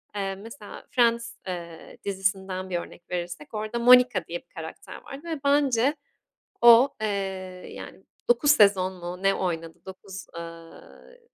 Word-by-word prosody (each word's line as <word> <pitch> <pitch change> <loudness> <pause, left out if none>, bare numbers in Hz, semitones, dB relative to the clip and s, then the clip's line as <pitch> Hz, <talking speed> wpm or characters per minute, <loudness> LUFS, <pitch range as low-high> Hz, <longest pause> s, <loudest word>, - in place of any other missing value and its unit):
Eee, 195 -1 -2
mesela 225 +7 -11
Friends, 235 -2 +2
eee, 170 -3 -7
dizisinden 190 -1 -2
1 180 - -1
örnek 170 0 -12
verirsek 175 -4 -5
orada 215 +2 -3
Monica 250 +1 +6
diye - - -4
bir - - -45
karakter - - -8
vardı 275 +1 -9
ve 320 -3 -3
bence 280 -1 +3 0.7
o, 235 +2 +8
eee, 220 - 0 0.7
yani 190 - -10 0.2
9 240 +4 +4
sezon 200 -8 +5
mu 180 0 -7
ne 195 0 +3
oynadı. 165 -3 -3
9, 190 0 -9
ııı, 165 - -11
195 Hz, 140 wpm, -26 LUFS, 180-240 Hz, 0.7 s, o